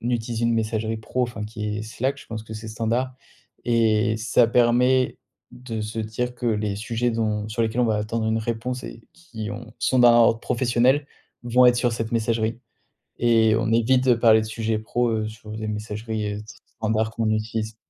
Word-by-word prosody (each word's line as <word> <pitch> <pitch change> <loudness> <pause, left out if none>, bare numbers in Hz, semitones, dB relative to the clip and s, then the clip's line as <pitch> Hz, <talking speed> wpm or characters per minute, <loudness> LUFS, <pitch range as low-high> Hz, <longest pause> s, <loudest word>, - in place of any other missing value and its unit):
utilise 120 -1 -2
une 115 0 +2
messagerie 110 0 -1
pro, 110 +3 -2
enfin, 120 -3 -6
qui 105 -1 -4
est 110 - -4
Slack, 130 +5 -2
je - - -12
pense 110 -1 -6
que 110 0 -9
c'est 110 +1 -7
standard 115 +4 -1 0.5
et 110 -2 +2
ça 115 +2 +3
permet 125 +2 +3 0.3
de 120 -3 -6
se 110 +2 -5
dire 115 +3 -3
que 125 - -5
les 105 -3 0
sujets 115 +3 -1
dont 110 -2 -1
sur 110 - -3
lesquels 115 +2 0
on - - +3
va 110 -2 +1
attendre 110 +2 -2
une 110 0 +1
réponse 120 +3 -3
et 115 - -9
qui 115 -11 -8
ont 115 +2 -8
sont 130 - +1
d'un 120 -1 +7
ordre 115 -1 +4
professionnel, 125 +4 +2 0.4
vont 125 +1 +4
être 125 0 +5
sur 120 -1 +1
cette 115 0 -4
messagerie. 115 0 0 0.6
Et 115 -2 +4
on 115 0 0
évite 125 +3 +3
de 125 - +6
parler 115 -1 +5
de 110 - -4
sujets 110 0 -2
pro, 120 +2 0
heu, 110 -1 -1
sur 110 0 -10
des 110 0 -5
messageries, 105 0 -4
heu, - - -5
st 110 - -14 0.2
standards 110 0 0
qu'on 115 -1 -1
utilise. 110 0 -2
115 Hz, 200 wpm, -24 LUFS, 110-120 Hz, 0.6 s, d'un